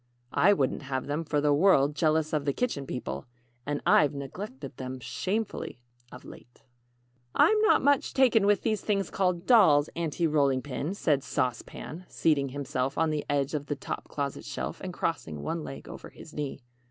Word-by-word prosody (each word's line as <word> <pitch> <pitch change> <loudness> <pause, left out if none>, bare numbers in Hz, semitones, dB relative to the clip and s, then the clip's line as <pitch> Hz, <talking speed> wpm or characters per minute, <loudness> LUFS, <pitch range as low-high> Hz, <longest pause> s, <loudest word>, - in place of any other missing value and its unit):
("I 200 - +5
wouldn't 140 -9 +1
have 130 -2 -3
them, 145 +3 -2
for 150 -2 0
the 145 0 +3
world, 145 -3 +4
jealous 155 0 +1
of 150 -2 0
the 140 - +1
Kitchen 140 - -2
People 70 - -5 0.4
and 145 0 -1
I've 145 -1 +4
neglected 140 - -7
them 130 0 -5
shamefully 190 - -3 0.3
of 125 - -11
late.") 120 - -14 0.7
"I'm 435 -1 +5
not 435 - +4
much 285 -1 +2
taken 230 -6 +4
with 205 -1 +3
those 215 -2 0
things 200 -3 -1
called 180 -2 0
'dolls,' 160 - +5
Aunty 170 0 -1
Rolling 140 -4 +2
Pin," 145 +6 -3
said 145 -8 +1
Sauce 125 -2 -1
Pan, 175 +4 -9
seating 140 -4 +1
himself 135 -1 -3
on 160 -1 +2
the 150 -1 -1
edge 140 0 0
of 145 -1 -3
the 145 - -1
top 140 - -6
closet 140 -2 -4
shelf, - - -5
and - - -5
crossing 75 -2 -3
one 165 -1 -3
leg 135 - -8
over - - -9
his 160 - -13
knee. 145 -2 -4
150 Hz, 180 wpm, -28 LUFS, 140-180 Hz, 0.7 s, I